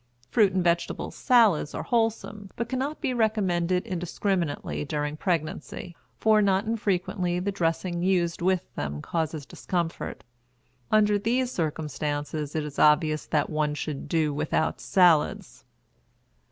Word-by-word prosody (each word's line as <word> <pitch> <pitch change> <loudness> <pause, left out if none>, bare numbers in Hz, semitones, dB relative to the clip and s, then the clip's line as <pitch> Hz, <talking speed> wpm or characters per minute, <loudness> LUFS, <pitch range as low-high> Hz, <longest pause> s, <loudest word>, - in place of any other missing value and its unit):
Fruit 205 -4 +4
and 185 -1 0
vegetable 170 -1 0
salads 225 - +3
are - - -3
wholesome, 225 -3 -1
but 235 - -3
cannot 265 +4 -3
be 255 - 0
recommended 185 -6 +1
indiscriminately 175 - -2
during 150 - -2
pregnancy, 165 0 -3 0.2
for 215 -1 +4
not 195 0 +2
infrequently 190 -4 -1
the 195 +3 -1
dressing 175 -1 -1
used 175 -2 +1
with 185 0 0
them 75 0 -4
causes 160 -3 -2
discomfort. 170 0 -4 0.7
Under 210 -1 +4
these 245 +4 0
circumstances 150 - -3
it 155 - 0
is 150 -1 -6
obvious 155 0 +3
that 150 0 0
one 150 -1 0
should 150 -2 -5
do 155 -3 +1
without 150 +2 -1
salads. 175 -5 +2
175 Hz, 125 wpm, -26 LUFS, 155-205 Hz, 0.7 s, Fruit